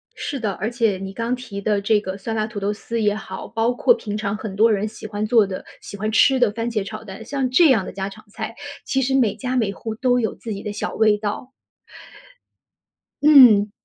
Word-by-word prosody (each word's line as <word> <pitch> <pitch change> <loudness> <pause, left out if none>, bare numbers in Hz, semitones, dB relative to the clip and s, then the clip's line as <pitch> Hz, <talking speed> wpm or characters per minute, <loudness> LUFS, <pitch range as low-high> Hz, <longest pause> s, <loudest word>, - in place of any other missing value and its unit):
是 280 - -4
的， 215 -4 -1
而 215 +4 -3
且 225 -5 0
你 195 0 -7
刚 230 +4 -2
提 225 -6 -8
的 205 -1 0
这 210 +1 +3
个 190 -1 -5
酸 225 +3 -4
辣 215 -1 0
土 215 -2 -6
豆 200 +1 -1
丝 230 +2 -4
也 205 -1 +2
好， 210 -3 -7
包 225 +2 0
括 365 - +4
平 210 - -5
常 215 -1 -2
很 210 -3 -6
多 225 +2 +4
人 210 +1 0
喜 215 0 -9
欢 210 0 -3
做 215 -2 +4
的、 185 - -6 0.2
喜 - - -9
欢 215 +2 -2
吃 265 +4 +4
的 245 -4 +3
番 230 +2 -3
茄 215 -4 -1
炒 215 +2 -8
蛋， 205 +1 -9
像 265 +1 -2
这 310 +4 +5
样 220 -7 +3
的 - - -6
家 195 0 -4
常 215 +2 -14
菜， 220 +2 -6 0.3
其 270 - 0
实 265 +1 0
每 235 -6 +2
家 255 -1 -3
每 220 -5 +1
户 220 +2 -6
都 250 +1 +2
有 220 - -1
自 225 - -6
己 200 - -7
的 210 - -4
小 210 - -4
味 215 -1 +3
道。 210 +5 -5 1.7
嗯。 245 -9 +7
220 Hz, 250 characters per minute, -21 LUFS, 205-235 Hz, 1.7 s, 嗯